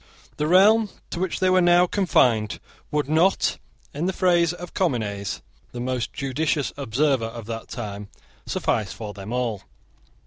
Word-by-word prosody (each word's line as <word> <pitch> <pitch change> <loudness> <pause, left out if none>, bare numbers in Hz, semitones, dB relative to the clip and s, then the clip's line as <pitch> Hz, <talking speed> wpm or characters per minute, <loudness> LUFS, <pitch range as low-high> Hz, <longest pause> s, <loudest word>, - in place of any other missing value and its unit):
The 150 - 0
realm 205 +5 +5 0.2
to 170 - -4
which 185 -1 -2
they 185 -1 +3
were 185 0 +5
now 175 0 +5
confined 125 - +2 0.3
would 150 -2 -1
not, 160 +6 +2 0.3
in 155 +5 -2
the 190 - 0
phrase 175 -3 +3
of 175 0 -9
Comines, 105 - -2 0.3
the 120 - -6
most 125 -1 -2
judicious 140 +1 -1
observer 135 -1 +1
of 115 -1 -8
that 115 0 -6
time, 105 -4 -6 0.4
suffice 105 -3 -1
for 105 0 -7
them 100 +2 -8
all. 120 -5 -1
140 Hz, 150 wpm, -24 LUFS, 115-175 Hz, 0.4 s, realm